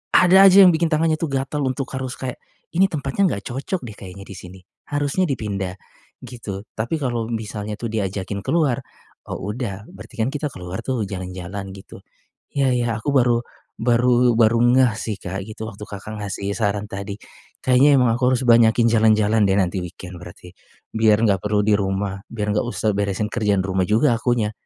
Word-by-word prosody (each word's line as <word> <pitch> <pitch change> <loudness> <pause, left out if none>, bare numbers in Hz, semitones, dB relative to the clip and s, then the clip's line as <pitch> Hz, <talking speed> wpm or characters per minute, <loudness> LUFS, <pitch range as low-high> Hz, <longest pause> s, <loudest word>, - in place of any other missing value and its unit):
ada 180 +1 +6
aja 195 +1 +8
yang 180 - +8
bikin 165 +1 +1
tangannya 160 +1 +2
tuh 160 -4 -2
gatel 135 +2 -2
untuk 130 +1 -2
harus 130 -1 -4
kayak, 130 -2 -5 0.4
"Ini 190 +3 +5
tempatnya 145 +5 -1
enggak 100 - -4
cocok 140 +9 -3
deh 110 - -8
kayaknya 95 0 -10
di 100 - -9
sini. 95 0 -11 0.3
Harusnya 145 +5 0
dipindah," 100 - -3 0.5
gitu. 110 -5 -7
Tapi 115 +8 -1
kalau 120 -4 -1
misalnya 105 -2 -4
tu 115 - -3
diajakin 100 -2 -3
keluar, 150 -7 +1 0.5
oh - - -5
udah, 105 -1 -4
berarti - - -13
kan 110 +3 +1
kita 150 +1 -2
keluar 90 -3 -7
tuh 130 -4 -1
jalan-jalan 95 +1 -6
gitu. 95 - -12 0.5
Iya 135 -2 +2
iya 120 -1 0
aku 145 - -2
baru 120 -2 +4 0.4
baru 120 0 +3
baru 115 0 +4
ngeh 125 0 +4
sih 110 -3 -4
Kak 95 +2 -5
gitu, 110 0 -7
waktu 105 -1 -10
Kakak 105 +2 -8
ngasih 100 0 -4
saran 105 -2 -1
tadi. 100 0 -5 0.5
Kayaknya 135 +3 +5
emang 125 - +3
aku 125 +1 +2
harus 125 - -2
banyakin 115 0 +5
jalan-jalan 110 -1 +3
deh 95 - +2
nanti 95 -1 0
weekend 90 +1 -9
berarti 90 0 -12 0.4
biar 110 0 +3
enggak 100 -3 +3
perlu 105 0 +1
di 105 - +3
rumah, 95 0 -2
biar 105 -2 -2
enggak 110 - 0
usah 110 -2 -1
beresin 100 +1 -1
kerjaan 105 -4 +1
rumah 95 -1 0
juga 115 +4 +3
akunya. 115 -2 0
110 Hz, 180 wpm, -21 LUFS, 100-125 Hz, 0.5 s, aja